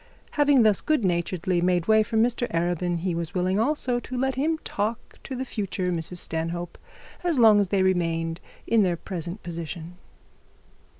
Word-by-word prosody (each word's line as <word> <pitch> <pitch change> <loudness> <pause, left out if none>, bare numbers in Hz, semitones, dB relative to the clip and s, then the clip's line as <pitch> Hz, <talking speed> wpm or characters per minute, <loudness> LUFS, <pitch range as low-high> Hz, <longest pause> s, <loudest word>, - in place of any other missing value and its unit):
Having 285 -4 +4
thus 215 -2 +3
good 305 -9 +1
naturedly 175 0 0
made 175 -1 +1
way 220 0 +6
for 220 +1 -1
Mr 240 +2 +1
Arabin, 175 0 -1
he 180 0 -1
was 170 +1 -4
willing 185 +2 +1
also 250 -1 +1
to 255 +1 -6
let 265 +1 +1
him 305 +5 0
talk 215 +3 -4
to 265 - -6
the 260 +1 -3
future 190 -6 -2
Mrs 170 +1 -4
Stanhope 165 +1 -3 0.4
as 345 -4 +1
long 220 -3 +7
as 200 - +2
they 190 0 +1
remained 165 -2 0 0.2
in 230 -1 +3
their 180 -3 +1
present 175 +3 -6
position. 170 0 -6
185 Hz, 170 wpm, -25 LUFS, 170-230 Hz, 0.4 s, long